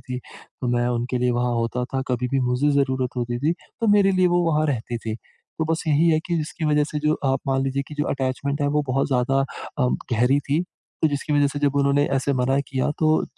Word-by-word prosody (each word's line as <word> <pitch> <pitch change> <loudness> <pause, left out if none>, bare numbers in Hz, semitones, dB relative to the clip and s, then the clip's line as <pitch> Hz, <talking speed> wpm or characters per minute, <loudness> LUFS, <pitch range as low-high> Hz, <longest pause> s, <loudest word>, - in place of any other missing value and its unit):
थी, 125 0 -6 0.4
मैं 120 0 +1
उनके 125 +1 -1
लिए 125 0 +2
वहाँ 120 0 0
होता 115 +1 -1
था, 130 +1 -3
कभी 125 0 -1
भी 135 0 +1
मुझे 135 +4 +2
ज़रूरत 130 -2 0
होती 120 0 -2
थी, 155 +4 +2 0.3
तो 230 - +1
मेरे 200 -1 +5
लिए 185 -1 +3
वो 175 0 +2
वहाँ 155 +1 +2
रहती 120 -4 -2
थी। 110 -1 -4 0.4
तो 160 - +1
बस 165 - -1
यही 155 +3 +4
है 155 - +3
कि 175 - 0
जिसकी 155 0 -4
वजह 150 -1 +3
से 150 0 -4
जो 150 +1 +2
आप 135 0 +1
मान 135 0 +1
लीजिए 135 +1 -1
कि 150 - -8
जो 150 - +1
अटैचमेंट 140 +2 -2
है, - - +2
वो 150 +1 +1
बहुत 135 +2 +1
ज़्यादा 135 +1 +2 0.4
अ, 125 - +3 0.3
गहरी 125 +5 +3
थी। 155 +4 +2 0.4
तो 160 - +5
जिसकी 145 +1 -3
वजह 145 -1 +4
से 145 +1 -5
जब 145 -1 +1
उन्होंने 140 +1 +3
ऐसे 135 +1 0
मना 130 +2 +1
किया 130 +1 0
तो 155 -1 +4
अ, - - -2
140 Hz, 240 wpm, -23 LUFS, 125-150 Hz, 0.4 s, मेरे